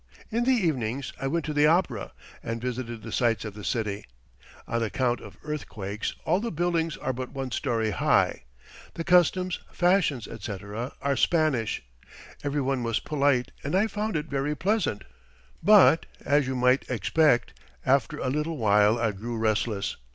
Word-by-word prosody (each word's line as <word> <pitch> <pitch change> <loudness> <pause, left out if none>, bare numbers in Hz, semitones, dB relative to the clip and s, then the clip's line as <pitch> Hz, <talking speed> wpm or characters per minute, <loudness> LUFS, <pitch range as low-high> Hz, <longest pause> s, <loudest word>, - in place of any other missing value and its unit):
In 235 +2 0
the 265 - +4
evenings 140 - -1
I 135 - 0
went 165 +3 -1
to 155 - -3
the 150 0 +4
opera, 140 - +1 0.3
and 115 0 -4
visited 120 -2 -4
the 115 - -7
sights 115 -3 +1
of 105 - -5
the 105 0 -10
city. 105 -3 -2 0.6
On 115 - -1
account 120 +2 0
of - - -12
earthquakes, 110 -9 -4
all 175 +4 +2
the 230 +2 -3
buildings 165 -1 0
are 130 - -2
but 130 0 -5
one 135 -2 -4
story 115 -4 0
high. 90 - +2 0.5
The 165 - -3
customs, 180 +1 +3
fashions, 175 - +2
etc., 105 +2 -6
are 140 0 +1
Spanish. 145 - +1 0.6
Every 145 0 0
one 135 -1 0
was 115 -2 0
polite 140 -4 +1
and 145 +5 -1
I 195 +3 +4
found 215 0 -3
it 150 -1 -1
very 140 0 -2
pleasant; 195 - 0 0.6
but, 200 -6 +6 0.2
as 145 -1 +3
you 130 - -2
might 125 +1 +2
expect, 135 +2 +2 0.3
after 135 -2 +2
a 130 - -2
little 150 +3 -2
while 105 -1 +4
I 115 -2 +1
grew 115 +4 -5
restless. 110 -2 0
130 Hz, 165 wpm, -27 LUFS, 115-160 Hz, 0.6 s, but